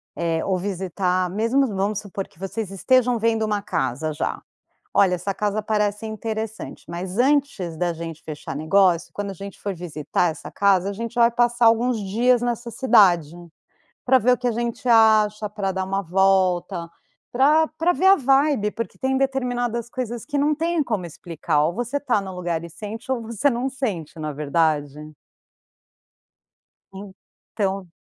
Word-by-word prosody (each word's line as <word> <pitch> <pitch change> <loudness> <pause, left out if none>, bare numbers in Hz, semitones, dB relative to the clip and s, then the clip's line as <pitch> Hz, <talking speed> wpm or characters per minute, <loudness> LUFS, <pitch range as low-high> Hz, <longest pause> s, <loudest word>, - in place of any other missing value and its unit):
eh, 165 -1 -1
ou 190 -1 +1
visitar 185 -1 -1
mesmo 230 +8 +1
vamos 200 0 -1
supor 200 -2 -6
que 160 - -26
vocês 195 +1 -4
estejam 245 +4 +2
vendo 225 0 +1
uma 210 -1 -1
casa, 155 -5 -2
já: 150 - -3 0.5
“Olha, 185 -2 +4
essa 185 +3 -3
casa 210 +1 -1
parece 210 0 -1
interessante. 220 0 -5
Mas, 180 +3 -5
antes 260 - +1
da 175 +1 0
gente 165 -1 -7
fechar 150 -1 -7
negócio, 175 +2 +2
quando 205 -1 -4
a - - -7
gente 195 +1 -9
for 200 -1 -3
visitar 170 0 -1
essa 155 - -10
casa, 195 -1 +2
a - - -4
gente 230 +3 -5
vai 235 0 +5
passar 240 0 +2
alguns 235 +2 +3
dias 235 +5 +2
nessa 240 -1 -2
cidade.” 200 - +4 0.7
Pra 260 +1 +5
ver 250 +2 +3
o 250 - +1
que 250 - -3
a 245 - +2
gente 235 +2 -3
acha, 215 -2 +4
pra 200 -2 -2
dar 190 0 -2
uma 195 +1 -1
volta, 185 -1 +1 0.4
pra 300 +6 +4
pra 345 +2 +2
ver 370 +2 0
a 390 - +9
vibe, 270 - +2
porque 230 -4 -6
tem 265 0 0
determinadas 245 -3 -1
coisas 240 -3 -4
que 290 -2 -2
não 295 +2 +2
têm 330 +2 0
como 205 -8 -2
explicar. 155 -2 -1
Ou 165 +3 0
você 245 +5 -2
tá 250 -7 0
no 190 -1 -7
lugar 175 -2 -2
e 170 - -9
sente, 220 +7 -8
ou 255 -3 0
você 230 +5 0
não 245 +2 -1
sente, 220 - -4
não 155 - -3
é 145 - -7
verdade. 150 0 -1 1.8
Então 195 0 -6
205 Hz, 170 wpm, -23 LUFS, 180-240 Hz, 1.8 s, a